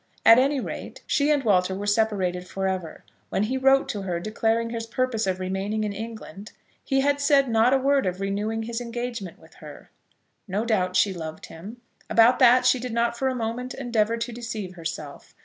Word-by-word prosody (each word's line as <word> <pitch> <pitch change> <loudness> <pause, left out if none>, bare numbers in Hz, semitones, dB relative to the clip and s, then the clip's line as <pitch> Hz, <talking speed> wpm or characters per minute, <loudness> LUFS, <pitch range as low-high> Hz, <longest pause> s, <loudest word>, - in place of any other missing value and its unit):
At 230 +2 +9
any 275 +2 +2
rate, - - -7
she 285 0 +1
and 290 -2 +2
Walter 190 -4 +2
were 200 +2 -5
separated 200 -4 0
for 190 +1 -2
ever. 185 -4 -4 0.2
When 195 - 0
he 240 +5 -1
wrote 270 +1 +4
to 205 - -3
her, 180 -3 -3
declaring 225 +4 -1
his 230 -1 -4
purpose 235 -3 -1
of 185 -1 -1
remaining 195 +3 -2
in 210 -1 -2
England, 215 -2 -8 0.3
he 270 -1 +1
had 285 +1 +1
said 280 -1 +4
not 225 +1 +3
a 270 - +5
word 275 -3 +2
of 185 0 -3
renewing 205 +3 -2
his 235 +1 -4
engagement 235 -5 -5
with - - -19
her. - - -12 0.6
No 205 +4 -2
doubt 185 -5 0
she 200 - +3
loved 160 -3 -7
him. 210 +9 -11 0.3
About 230 +2 +5
that 250 +1 +6
she 255 0 +4
did 245 -1 -5
not 235 0 +1
for 265 +3 -1
a 260 - -1
moment 245 +2 -4
endeavour 230 -3 0
to 235 +1 -4
deceive 225 -5 -6
herself. 165 -4 -7
225 Hz, 200 wpm, -25 LUFS, 195-245 Hz, 0.6 s, At